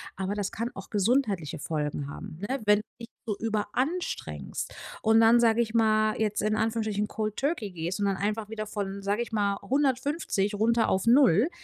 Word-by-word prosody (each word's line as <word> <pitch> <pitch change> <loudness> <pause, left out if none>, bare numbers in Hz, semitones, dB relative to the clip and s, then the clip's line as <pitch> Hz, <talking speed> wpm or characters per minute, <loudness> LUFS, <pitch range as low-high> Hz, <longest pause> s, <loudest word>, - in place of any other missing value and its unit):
aber 195 +2 -2
das 205 -2 -2
kann 230 +3 -3
auch - - -9
gesundheitliche 205 - +1
Folgen 150 -2 -3
haben, 155 - -8
ne, 270 +3 -1
wenn 210 0 +6
du - - -7 0.2
dich 230 - -7 0.2
so 215 -3 -1
überanstrengst 230 - -3 0.3
und 225 0 +4
dann, 230 +1 +6
sage 230 -1 +3
ich 225 -1 -2
mal, 215 -1 +3
jetzt 210 -1 0
in 215 +1 +1
Anführungsstrichen, 215 -1 0
Cold 215 -1 -3
Turkey 270 - -1
gehst 175 +2 -4
und 205 - +1
dann 195 -1 +1
einfach 210 +2 -2
wieder 215 -1 -5
von, 200 -2 -4
sage 200 +3 0
ich 240 - -11
mal, 200 -2 +1
150 265 -6 0
runter 225 +2 +2
auf 190 +3 0
0, 245 - +5
215 Hz, 185 wpm, -28 LUFS, 200-230 Hz, 0.3 s, wenn